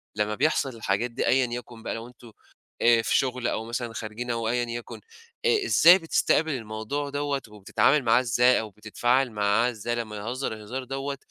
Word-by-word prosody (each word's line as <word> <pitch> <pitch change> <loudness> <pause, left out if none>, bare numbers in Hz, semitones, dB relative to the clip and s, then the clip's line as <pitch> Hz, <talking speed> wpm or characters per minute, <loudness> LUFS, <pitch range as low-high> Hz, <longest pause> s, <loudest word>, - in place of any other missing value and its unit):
لمّا 105 0 -1
بيحصل 140 +1 +1
الحاجات 110 +2 -1
دي - - -2
أيًا 130 0 +3
يكن 120 -2 -8
بقى - - -3
لو 115 +1 -7
أنتم 120 -1 -15 0.5
آآ 115 -1 +5
في - - +1
شُغل 125 -2 -1
أو 110 - -2
مثلًا 120 0 -4
خارجين 115 +2 -5
أو 115 -1 -2
أيًا 120 +1 0
يكن، 120 0 -7 0.4
آآ 440 -4 +3
إزاي 175 - +7
بتستقبل 165 -2 +1
الموضوع 115 +3 -4
دَوّة 145 -1 -2
وبتتعامل 105 +7 +1
معاه 115 0 +4
إزاي 125 +1 +3
أو 110 - -5
بتتفاعل 120 +5 0
معاه 105 +3 +2
ازاي 120 +1 -4
لمّا 110 -3 -5
يهزر 120 +5 -4
الهزار 110 +5 -6
دَوّة، 135 +2 -4
120 Hz, 180 wpm, -26 LUFS, 110-135 Hz, 0.5 s, إزاي